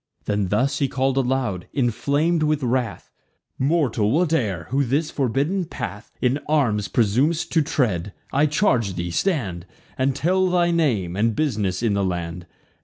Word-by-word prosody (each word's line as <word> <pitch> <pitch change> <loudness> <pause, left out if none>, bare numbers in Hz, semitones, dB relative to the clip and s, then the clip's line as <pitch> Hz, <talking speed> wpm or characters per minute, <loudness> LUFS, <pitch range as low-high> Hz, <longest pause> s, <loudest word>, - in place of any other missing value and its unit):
Then 105 -2 0
thus 125 +9 +1
he 140 - +2
call'd 130 +1 0
aloud, 125 -8 -1
inflam'd 145 +6 +1
with 150 -2 +1
wrath: 125 -1 -2 0.5
"Mortal, 130 -7 +1
whate'er, 130 - +1
who 140 +2 +2
this 145 +5 0
forbidden 145 - 0
path 105 - -7
In 130 +3 +1
arms 115 -10 +2
presum'st 140 +10 +1
to 165 - +3
tread, 105 - 0 0.2
I 145 +3 +4
charge 125 - +1
thee, 85 0 -3
stand, 100 - -1 0.3
And 130 0 +1
tell 185 +5 +2
thy 175 -1 +2
name, 115 - +1
and 110 +2 +1
bus'ness 110 -10 -1
in 110 -3 +2
the 100 0 +1
land. 90 -1 -3
130 Hz, 150 wpm, -23 LUFS, 105-150 Hz, 0.5 s, I